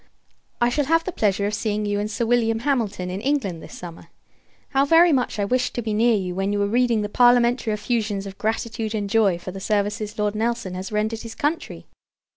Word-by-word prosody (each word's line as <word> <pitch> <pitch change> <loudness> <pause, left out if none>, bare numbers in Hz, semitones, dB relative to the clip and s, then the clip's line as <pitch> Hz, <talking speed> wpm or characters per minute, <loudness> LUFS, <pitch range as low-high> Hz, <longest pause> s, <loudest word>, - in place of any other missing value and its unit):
I 240 - +3
shall 290 +3 0
have 330 +3 +2
the 370 - -4
pleasure 200 - 0
of 205 - -1
seeing 210 0 -1
you 205 0 0
and 210 +1 -2
Sir 230 +3 -2
William 225 -1 +1
Hamilton 215 -10 -1
in 190 +2 -4
England, 230 - -1
this - - -10
summer. 170 -2 -10 0.6
How 270 -1 +2
very 330 +4 +6
much 250 -4 0
I 205 - 0
wished 250 +4 0
to 240 - -2
be 215 -1 -2
near 230 +2 +3
you, 185 -3 -2
when 195 +2 -1
you 205 - 0
were 200 - +1
reading 235 0 +2
the - - -1
parliamentary 240 +1 +3
effusions 210 -2 -1
of 195 0 -9
gratitude 220 0 -2
and 205 -2 -2
joy 200 -4 +3
for 180 +2 -7
the 195 - -7
services 210 +1 -1
Lord 210 -1 0
Nelson 230 -3 -2
has 185 +4 -6
rendered 215 +1 -1
his 230 -1 -8
country! 305 +3 -3
215 Hz, 220 wpm, -23 LUFS, 205-240 Hz, 0.6 s, very